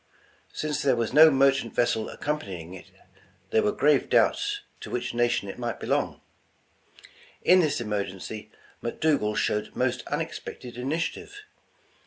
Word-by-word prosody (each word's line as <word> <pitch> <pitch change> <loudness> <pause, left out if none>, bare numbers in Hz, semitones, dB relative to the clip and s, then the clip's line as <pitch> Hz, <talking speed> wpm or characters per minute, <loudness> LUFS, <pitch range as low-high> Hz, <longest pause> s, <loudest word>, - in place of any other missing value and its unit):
Since 150 -1 -2
there 135 -3 +3
was 115 0 -2
no 160 +2 +9
merchant 135 -4 +2
vessel 110 -2 +1
ac - - -10
companying 95 - -4
it, 95 - -11 0.6
there 110 - +4
were 105 - +2
grave 150 -1 +2
doubts 410 0 +2 0.2
to - - -8
which 125 -1 -3
na 120 0 +3
tion 120 -4 -1
it 100 - -7
might 120 -1 -3
belong. - - -1 1.2
In 185 - +6
this 155 -6 +1
emergency, 105 -1 -4 0.3
McDougal 120 -4 0
showed 105 0 -1
most - - 0
unexpected 120 -2 -5
initiative. 165 - -3
120 Hz, 140 wpm, -26 LUFS, 105-150 Hz, 1.2 s, no